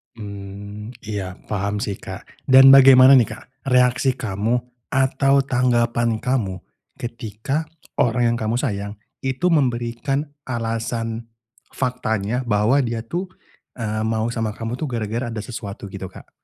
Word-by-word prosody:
Mmm, 100 +1 -8
iya 100 -4 -4 0.2
paham 100 0 -1
sih 100 -2 -3
Kak, - - -11
dan 135 0 +9
bagaimana 135 0 +9
nih 120 - +1
Kak 130 - -18
reaksi 125 0 +3
kamu 115 +1 -1 0.2
atau 135 +1 +2
tanggapan 120 -3 +1
kamu 120 -7 0 0.4
ketika 120 +6 -4 0.3
orang 120 0 +2
yang 120 - 0
kamu 110 0 -1
sayang 100 -4 -2 0.3
itu 130 +7 +1
memberikan 130 -1 0 0.2
alasan 115 -1 -3 0.5
faktanya 125 -2 -1
bahwa 105 +5 +3
dia 115 -4 -1
tuh, 175 +11 -3 0.5
eee, 110 -2 -2
mau 110 +1 0
sama 115 -2 -2
kamu 115 +2 -4
tuh 155 - -2
gara-gara 115 -1 -3
ada 110 - -4
sesuatu 105 -3 -7
gitu 95 0 -6
Kak? 95 - -14
115 Hz, 130 wpm, -22 LUFS, 105-130 Hz, 0.5 s, dan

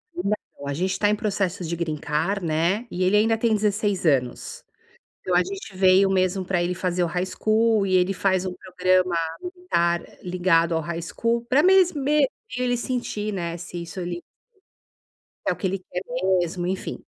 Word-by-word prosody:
Não, 210 - -4
a 140 - -2
gente 185 +6 -1
está 205 +2 +1
em 210 - +3
processo 195 -4 -2
de 170 0 -2
Green 165 -2 -2
Card, 170 +6 -1
né, 170 +8 +1
e 180 - -1
ele 190 +3 +4
ainda 225 +1 +3
tem 225 0 +2
16 205 -2 0
anos. 130 -6 0 0.6
Então, 180 - -1
a 180 - +5
gente 195 +2 -7
veio 190 +1 +5
mesmo 185 0 +1
pra 180 -1 0
ele 175 +1 -1
fazer 180 -1 -1
o - - +2
high 180 +2 -1
school 215 +2 +2
e 185 - 0
ele 180 +1 +3
faz 190 -1 +1
um 185 - -3
programa 185 -1 +1 0.3
militar 355 - 0 0.2
ligado 175 -2 +2
ao 160 - +1
high 170 +2 -4
school 230 +7 -1
pra 275 +4 +4
mes 375 0 +5
me 290 0 +2 0.3
ele 250 -1 +1
sentir, 240 -4 -3
né, 170 -3 -3
se 175 0 -7
isso 170 +2 -9
ele 175 -1 -4 1.3
é - - +4
o - - -10
que 190 - -2
ele 190 +1 -2
quer 180 0 -6 0.4
mesmo, 175 +1 -3
enfim. 190 +1 -4
185 Hz, 185 wpm, -24 LUFS, 175-210 Hz, 1.3 s, a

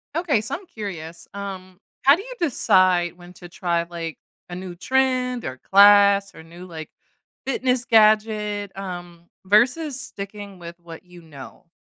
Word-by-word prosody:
Okay. 310 -10 +1
So, 220 - -4
I'm 380 +2 -10
curious, 170 - -8
um, 190 -2 -8 0.2
how 275 +2 +7
do 375 - -7
you - - -9
decide 185 - +2
when 175 0 -14
to 175 -1 -13
try, 170 -1 -1
like, 170 -2 -7 0.3
a 175 - -6
new 180 -1 -7
trend 255 +3 0
or 130 0 -5
class 200 +3 +5
or 160 - -12
new, 170 +2 -12
like, 160 -3 -9 0.6
fitness 255 -2 0
gadget, 215 -2 +2
um, 175 -3 -8 0.2
versus 250 +8 +2
sticking 200 -3 -8
with 170 0 -10
what 170 -1 -12
you 180 -1 -15
know? 160 +1 -13
195 Hz, 150 wpm, -22 LUFS, 175-225 Hz, 0.6 s, how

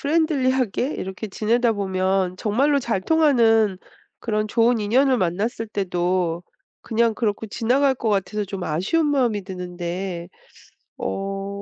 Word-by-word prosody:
...프렌들리하게 270 - +1
이렇게 190 +3 -5
지내다 230 +4 +1
보면 190 -2 0
정말로 275 +9 +2
잘 235 -6 -1
통하는 225 - +3 0.4
그런 215 -1 -1
좋은 230 +2 +2
인연을 255 +5 +3
만났을 205 +6 -1
때도 180 -3 -1 0.4
그냥 230 0 +1
그렇고 220 -1 -2
지나갈 260 +6 +2
것 225 - -2
같아서 205 +1 0
좀 195 -1 -6
아쉬운 190 - 0
마음이 245 -8 +1
드는데 180 -1 -5 0.7
어 195 0 -3
215 Hz, 290 characters per minute, -22 LUFS, 190-245 Hz, 0.7 s, 통하는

